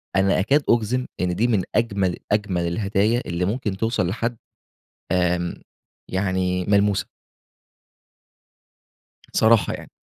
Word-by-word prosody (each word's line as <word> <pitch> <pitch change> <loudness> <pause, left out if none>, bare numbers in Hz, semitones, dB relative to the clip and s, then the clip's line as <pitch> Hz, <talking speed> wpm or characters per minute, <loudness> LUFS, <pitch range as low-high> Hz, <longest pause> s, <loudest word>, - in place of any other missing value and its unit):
أنا 95 0 +3
أكاد 140 +10 +2
أجزم 120 +2 +2 0.2
إن 90 -1 0
دي 120 +3 +2
من 105 -6 +1
أجمل 100 -5 +1
أجمل 95 -5 0
الهدايا 105 +6 +1
اللي 85 +1 -1
ممكن 105 -2 -2
توصل 110 -4 0
لحد 115 +4 -2 0.8
آمم 90 -1 +1 0.6
يعني 95 -1 0
ملموسة. 100 -1 +2 2.3
الصراحة 110 -4 +4
يعني، - - -8
100 Hz, 110 wpm, -23 LUFS, 90-115 Hz, 2.3 s, الصراحة